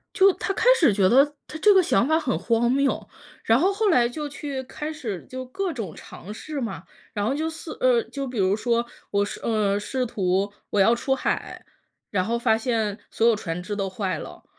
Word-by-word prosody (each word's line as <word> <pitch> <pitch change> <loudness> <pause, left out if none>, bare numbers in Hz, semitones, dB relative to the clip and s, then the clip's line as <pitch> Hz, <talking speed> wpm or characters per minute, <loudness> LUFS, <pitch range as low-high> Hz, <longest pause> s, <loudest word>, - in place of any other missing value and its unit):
就 390 -1 +6
他 390 - -3
开 395 - -2
始 290 - +5
觉 195 -1 +3
得 265 +7 +6 0.2
他 310 - -7
这 415 +5 +6
个 380 - +6
想 240 - +2
法 315 +1 +3
很 270 -6 -1
荒 235 0 +1
谬， 275 +1 +1 0.4
然 225 - +4
后 370 +6 +3
后 420 +1 +1
来 245 -9 +4
就 300 +4 -5
去 280 -1 -5
开 300 +4 -6
始 235 - -5
就 255 0 -6
各 375 +8 -3
种 220 - -6
尝 205 - -10
试 300 +6 -6
嘛。 195 - -4 0.3
然 205 -2 -1
后 245 - +1
就 315 +3 -1
似 320 0 -8
呃， - - +4
就 275 -6 -5
比 250 -2 -6
如 190 0 +3
说， 235 +2 0 0.3
我 200 0 +2
试 - - -7
呃， 210 -3 +1
试 255 +5 -2
图 200 -3 0 0.2
我 205 - 0
要 225 +5 +5
出 265 +3 0
海， 265 - -3 0.4
然 185 -3 0
后 235 +3 0
发 220 -2 +2
现 220 -3 -1
所 225 - 0
有 230 - +5
船 180 -4 -4
只 205 +3 -4
都 195 -1 -2
坏 190 0 -2
了。 - - -10
235 Hz, 235 characters per minute, -24 LUFS, 205-295 Hz, 0.4 s, 就